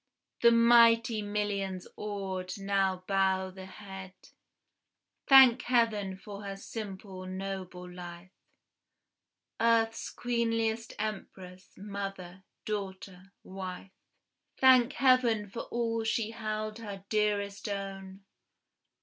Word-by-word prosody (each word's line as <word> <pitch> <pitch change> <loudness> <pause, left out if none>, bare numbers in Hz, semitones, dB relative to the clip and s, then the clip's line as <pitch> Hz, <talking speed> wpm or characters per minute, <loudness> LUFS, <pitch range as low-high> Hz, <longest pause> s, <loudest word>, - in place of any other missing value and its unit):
The 235 - +7
mighty 230 -1 +5
millions, 205 -3 -2
awed, 195 -2 -4
now 195 -2 0
bow 190 -1 +1
the 190 0 -10
head, 190 -1 -10 1.1
Thank 265 -3 +8
Heaven 215 -6 +1
for 200 +1 -9
her 195 -1 -5
simple, 195 -3 -7
noble 185 -1 -6
life, 180 0 -10 1.3
Earth's 225 0 +2
queenliest 230 -2 -1
empress, 190 -3 -6
mother, 195 -2 -6 0.2
daughter, 195 -2 -6
wife! 185 0 -7 0.7
Thank 260 -2 +6
Heaven 250 -5 +3
for 230 +4 -6
all 230 -1 -1
she 225 0 -1
held 215 -1 -4
her 200 -3 -8
dearest 210 -1 0
own! 195 -1 -6
200 Hz, 95 wpm, -30 LUFS, 190-225 Hz, 1.3 s, Thank